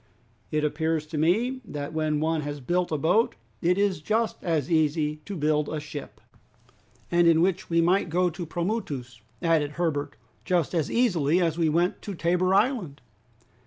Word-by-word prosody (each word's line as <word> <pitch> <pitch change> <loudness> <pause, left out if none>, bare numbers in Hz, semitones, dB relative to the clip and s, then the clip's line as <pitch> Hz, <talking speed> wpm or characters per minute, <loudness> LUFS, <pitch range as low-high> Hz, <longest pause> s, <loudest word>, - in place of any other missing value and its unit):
It 155 -1 0
appears 160 +1 0
to 155 0 -6
me, 230 - +1
that 145 -7 -6
when 155 -1 0
one 160 0 0
has 145 0 -5
built 175 +7 -1
a 155 - +1
boat 180 +10 +2 0.3
it 180 +2 +2
is 200 -5 +1
just 220 +7 -1
as 160 -4 -1
easy 155 -1 +1
to 200 - -5
build 150 -1 +1
a 155 - -3
ship!" 145 -1 -8 0.9
"And 175 0 +4
in 165 -1 +5
which 185 +1 +1
we 170 0 +3
might 180 +2 +2
go 180 +2 +2
to 175 +3 -9
the 170 - -4
Pomoutous," 150 - -3 0.2
added 155 -3 +2
Herbert, 145 -4 -2 0.3
"just 175 -4 0
as 160 -4 0
easily 175 - +2
as 170 -2 0
we 165 -2 +3
went 170 +4 +1
to 200 - -6
Tabor 180 +2 +1
Island." 200 - +1
165 Hz, 175 wpm, -26 LUFS, 150-180 Hz, 0.9 s, in